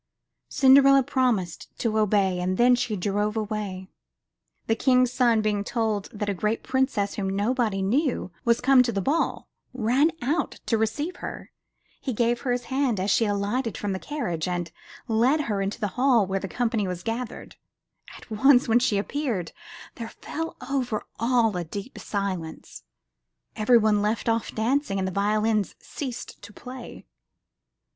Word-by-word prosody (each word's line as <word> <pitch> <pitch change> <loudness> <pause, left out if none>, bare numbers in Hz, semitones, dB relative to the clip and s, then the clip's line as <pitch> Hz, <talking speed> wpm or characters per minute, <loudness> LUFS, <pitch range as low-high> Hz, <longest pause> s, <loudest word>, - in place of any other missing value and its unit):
Cinderella 275 0 +6
promised 230 -10 0
to 220 -2 0
obey 195 -3 +2
and 185 +1 -1
then 245 +1 +5
she 245 -3 0
drove 205 +3 -1
away. 210 -3 -4 0.8
The 225 - +2
King's 250 +1 +3
son, 235 -4 +3
being 205 -1 0
told 215 -2 -1
that 210 -1 -4
a 200 - 0
great 215 +4 -1
princess 260 -7 0
whom 195 -2 -2
nobody 215 -2 0
knew 250 - 0
was 235 0 +2
come 265 0 +6
to 245 -1 +1
the 200 - -1
ball, 290 - -1 0.3
ran 255 +6 +3
out 290 +8 -1
to 225 - +1
receive 290 +11 -2
her. - - -7 0.5
He 260 - -3
gave 235 +2 +1
her 255 - -1
his 245 0 -1
hand 260 -4 0
as 195 +2 0
she 230 - +3
alighted 205 +4 -1
from 205 - -3
the 190 - -2
coach, 180 - -3
and 175 -1 -3 0.4
led 245 +7 +3
her 210 -8 -2
into 195 +3 -3
the 210 -3 -1
hall 245 0 +3
where 195 +1 -1
the 195 - -5
company 225 -2 -1
was 180 -1 -5
gathered. 235 +1 -5 0.6
At - - -16
once 260 +4 +5
when 230 +1 +4
she 235 -4 +1
appeared, 215 - -2 0.5
there 230 -1 -5
fell 325 +1 -6
over 250 -5 -1 0.2
all 230 -3 +2
a 175 - -2
deep 200 +9 -7
silence; 190 -6 -4 0.7
every 225 +3 +4
one 215 -2 +3
left 215 +3 -1
off 230 0 0
dancing 235 -1 0
and 190 -1 -1
the - - -3
violins 210 +1 +1
ceased 260 -5 -7
to 205 +1 -11
play. 250 +3 -10
225 Hz, 165 wpm, -25 LUFS, 200-250 Hz, 0.8 s, Cinderella